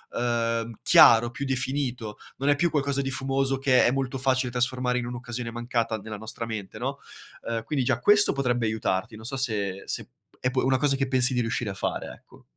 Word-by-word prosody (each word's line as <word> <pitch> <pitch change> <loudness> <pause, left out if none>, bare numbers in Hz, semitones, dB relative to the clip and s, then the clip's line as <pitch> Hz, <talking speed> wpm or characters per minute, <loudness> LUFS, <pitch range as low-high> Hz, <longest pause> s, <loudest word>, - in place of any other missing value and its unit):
ehm, 115 -1 -1
chiaro, 120 +1 +7
più 140 - -5
definito, 130 -4 -2 0.2
non 140 +2 0
è 145 - +5
più 170 +4 +1
qualcosa 140 -2 0
di 135 - -2
fumoso 135 0 0
che 130 -1 +4
è - - +3
molto 135 -1 -2
facile 130 -1 +1
trasformare 125 0 0
in 120 - -4
un'occasione 120 -1 -5
mancata 120 -1 -2
nella 110 +1 -7
nostra 110 +2 -5
mente, 105 -4 -6
no? - - -4 0.5
Ehm, 115 -1 -2
quindi 135 0 -1
già 130 -3 +1
questo 205 0 +4
potrebbe 125 -4 0
aiutarti, 110 -2 -2
non 110 +1 -11
so 135 +3 -4
se 110 -6 -1 0.2
se - - -3 0.5
p 130 - 0
è - - +1
una 130 0 +3
cosa 135 +1 +2
che 135 -1 -1
pensi 130 0 +4
di 125 - +1
riuscire 115 -2 -2
a - - -5
fare, 95 - -3
ecco. - - -19
125 Hz, 205 wpm, -26 LUFS, 115-135 Hz, 0.5 s, chiaro